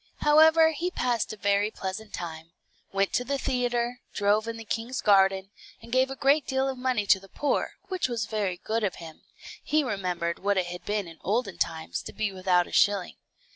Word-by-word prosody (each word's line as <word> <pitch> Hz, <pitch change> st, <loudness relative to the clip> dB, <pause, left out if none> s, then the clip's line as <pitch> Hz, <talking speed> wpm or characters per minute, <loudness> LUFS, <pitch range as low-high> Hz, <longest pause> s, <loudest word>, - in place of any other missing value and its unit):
However, 320 Hz, +2 st, +6 dB
he 335 Hz, +4 st, -2 dB
passed 245 Hz, -9 st, -1 dB
a 215 Hz, -, -8 dB
very 200 Hz, +1 st, +2 dB
pleasant 205 Hz, +1 st, -6 dB
time; 165 Hz, -2 st, -6 dB, 0.4 s
went 195 Hz, 0 st, 0 dB
to 245 Hz, -, +1 dB
the 275 Hz, +3 st, -2 dB
theatre, 245 Hz, -2 st, -1 dB, 0.2 s
drove 210 Hz, +2 st, +2 dB
in 230 Hz, 0 st, -4 dB
the 225 Hz, -, -9 dB
king's 230 Hz, +4 st, -3 dB
garden, 195 Hz, -1 st, +3 dB, 0.3 s
and 235 Hz, -, -14 dB
gave 260 Hz, +1 st, +3 dB
a 270 Hz, -, -5 dB
great 280 Hz, +3 st, +2 dB
deal 265 Hz, 0 st, 0 dB
of 265 Hz, -, -2 dB
money 250 Hz, -5 st, 0 dB
to 195 Hz, -, +5 dB
the 195 Hz, 0 st, -16 dB
poor, 290 Hz, -, -1 dB
which 370 Hz, -5 st, -1 dB
was 230 Hz, -3 st, -2 dB
very 205 Hz, -5 st, -2 dB
good 220 Hz, +4 st, -2 dB
of 195 Hz, -4 st, 0 dB
him; 160 Hz, -2 st, -11 dB, 0.4 s
he 305 Hz, 0 st, +2 dB
remembered 180 Hz, -7 st, -2 dB
what 200 Hz, 0 st, +1 dB
it 185 Hz, -, +2 dB
had 175 Hz, 0 st, -7 dB
been 205 Hz, -3 st, -1 dB
in 165 Hz, -1 st, -12 dB
olden 210 Hz, -1 st, -1 dB
times 160 Hz, 0 st, -2 dB
to -, -, -9 dB
be 215 Hz, -2 st, -1 dB
without 185 Hz, -2 st, +2 dB
a -, -, -13 dB
shilling. 200 Hz, -2 st, +2 dB
210 Hz, 205 wpm, -27 LUFS, 190-255 Hz, 0.4 s, However